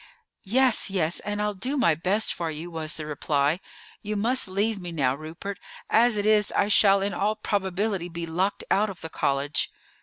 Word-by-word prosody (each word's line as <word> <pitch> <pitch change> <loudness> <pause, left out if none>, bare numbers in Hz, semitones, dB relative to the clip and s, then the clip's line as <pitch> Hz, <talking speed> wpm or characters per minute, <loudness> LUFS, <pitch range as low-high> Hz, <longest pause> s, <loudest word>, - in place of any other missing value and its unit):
"Yes, 255 +1 +3
yes; 175 -4 0
and 205 0 -4
I'll 210 0 0
do 255 +9 -3
my 170 - +4
best 185 +8 0
for 165 -1 -3
you," 160 +3 -6
was 160 -1 -3
the 155 - -5
reply. 150 +1 0 0.4
"You 210 0 -4
must 235 +5 +3
leave 200 +2 0
me 175 -1 -6
now, 135 -6 +1
Rupert. 160 +7 -7 0.3
As 235 -1 +4
it 205 - -1
is, 215 -1 +3
I 205 - +1
shall 195 -2 +5
in 200 -1 -1
all 210 +4 0
probability 195 -2 -1
be 170 0 -5
locked 180 +5 -1
out 210 +2 +3
of 190 - -8
the 160 - -6
college." 140 +2 0
195 Hz, 190 wpm, -25 LUFS, 165-210 Hz, 0.4 s, shall